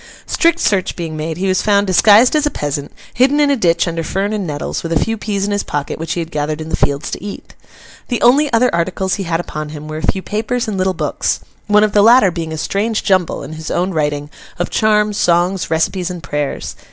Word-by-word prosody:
Strict 335 0 +2
search 190 -3 +1
being 165 -3 -5
made, 155 +1 -4
he 190 +2 -1
was 185 0 +2
found 205 -1 +2
disguised 210 - +5
as 300 -1 +2
a - - +1
peasant, 145 - -4 0.2
hidden 270 +4 +3
in 290 -1 +4
a - - +3
ditch 170 -7 +2
under 165 -1 -2
fern 195 +6 -2
and 205 -4 -2
nettles, 145 -1 -3
with 165 - -5
a 165 - +2
few 225 - 0
peas 205 -2 -2
in 205 - -2
his 205 0 0
pocket 145 0 -4
which 165 0 -3
he - - -3
had 165 0 -5
gathered 150 0 -2
in 160 0 -6
the - - 0
fields 140 +2 -1
to - - -6
eat. 205 -1 -8 0.5
The 240 - -1
only 275 +5 +4
other 245 +2 +3
articles 185 +2 -1
he 195 - -2
had 165 -1 -1
upon 155 -3 -5
him 150 0 -8
were 155 0 -5
a 160 - +1
few 190 - -6
papers 225 +3 -2
and 215 - -2
little 185 0 0
books: - - -1 0.3
one 210 0 +5
of 215 - +2
the 205 - +5
latter 225 -3 +6
being 165 -2 -5
a 160 - -4
strange 210 +7 -1
jumble, 185 -7 +1
in 145 +3 -8
his 160 0 -7
own 180 +2 0
writing, 150 -2 -2 0.3
of 175 - -3
charms, 210 -1 +2
songs, 175 -1 +1
recipes, 170 +3 0
and 175 -2 -7
prayers. 145 -1 -3
185 Hz, 240 wpm, -17 LUFS, 160-210 Hz, 0.5 s, latter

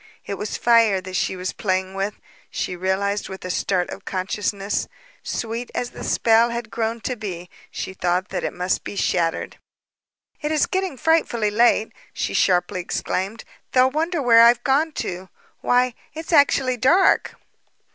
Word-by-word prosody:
It - - -4
was 210 +1 -4
fire 230 -5 +4
that 185 0 -8
she 190 - 0
was 185 +1 -4
playing 190 -1 -1
with, 195 +1 -2 0.3
she 180 - -3
realized 195 +3 -1
with 190 -1 -8
a 180 - -2
start 180 -1 0
of 195 - -8
consciousness. 195 +1 -2 0.3
Sweet 230 +1 -4
as 245 0 -2
the - - -9
spell 230 +1 +3
had 235 -2 -5
grown 225 +2 -2
to 250 +4 -3
be, 180 -6 -7 0.2
she 190 - -6
saw 180 +1 +2
that 190 - -5
it - - -1
must 180 +1 -1
be - - -7
shattered. 170 -3 -1 0.8
"It 300 - -2
is 310 -2 +3
getting 375 -7 -2
frightfully 240 -9 +1
late," 225 0 +3 0.2
she - - -2
sharply 180 -1 +2
exclaimed. 190 +4 -3 0.3
"They'll 255 0 +5
wonder 320 +1 -1
where 230 -2 +7
I've 235 +1 +6
gone 290 +4 +2
to. 185 -5 -5 0.3
Why, 250 0 +2 0.2
it's 320 +2 -5
actually 270 -4 +4
dark." 345 - +3
215 Hz, 160 wpm, -22 LUFS, 190-250 Hz, 0.8 s, where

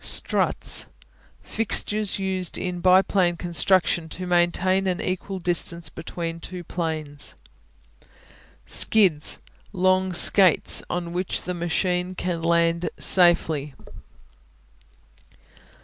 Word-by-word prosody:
Struts - - +1 0.6
Fixtures 215 -1 -1
used 190 -3 -3
in 180 -1 -4
biplane 185 -1 +3
construction 170 0 +1
to 185 +3 -6
maintain 180 +2 +1
an 185 -1 -1
equal 190 +1 -4
distance 170 -2 -2
between 165 +1 -6
two 180 +1 -8
planes. 155 -4 -5 1.3
Skids 185 -9 +1 0.3
Long 185 0 +1
skates 180 0 +5
on 175 -1 -4
which 180 +1 -3
the 180 - -4
machine 180 +1 -2
can 175 -2 -3
land 170 +1 +1
in - - -1
safety. 160 -6 +2
175 Hz, 95 wpm, -23 LUFS, 170-185 Hz, 1.3 s, skates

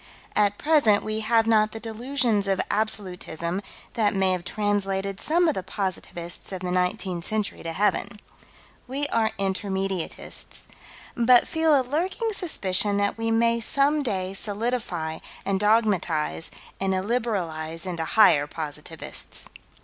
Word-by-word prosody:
At 205 -1 +3
present 290 -10 +4
we 215 0 -2
have 225 +1 +3
not 215 -1 +3
the 225 - -5
delusions 230 -2 0
of 195 0 +1
Absolutism 185 -4 -2 0.3
that 210 -3 +1
may 190 -1 +3
have 180 -1 -1
translated 195 0 -1
some 345 +2 +3
of 315 - +3
the 190 - -3
positivists 185 -3 -4
of 185 -1 -5
the 180 -1 -2
nineteenth 180 -1 -1
century 215 +1 -2
to 165 - -4
heaven. 205 +3 0 0.7
We 275 +3 -1
are 225 -1 +2
Intermediatists 195 -2 -2 0.5
but 240 +1 +5
feel 320 -3 +3
a - - 0
lurking 370 - -1
suspicion 205 - +1
that 200 0 +1
we 225 0 0
may 230 +1 +3
some 280 +6 +3
day 190 -7 -2
solidify 200 -7 -2 0.3
and 195 -1 0
dogmatize 195 -8 +1 0.3
and 190 0 +1
illiberalize 185 -7 -1
into 170 -3 -3
higher 155 -8 +5
positivists. 150 -1 -4
205 Hz, 135 wpm, -25 LUFS, 185-230 Hz, 0.7 s, but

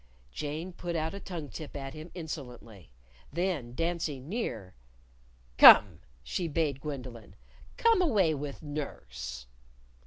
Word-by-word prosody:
Jane 155 - -5
put 175 -1 -5
out 160 +1 -1
a 200 - -6
tongue 170 -7 -6
tip 155 -3 -8
at 135 -1 -6
him 155 +2 -9
insolently. 125 - -8 0.4
Then 155 -7 -2
dancing 165 -5 -2
near, 120 - -4 0.9
"Come!" - - +10 0.2
she 170 - -2
bade 145 -3 -1
Gwendolyn. 130 -7 -7 0.4
"Come 455 -4 +4
away 205 - +3
with 145 +1 -6
Nurse." 65 - -6
150 Hz, 120 wpm, -30 LUFS, 125-170 Hz, 0.9 s, Come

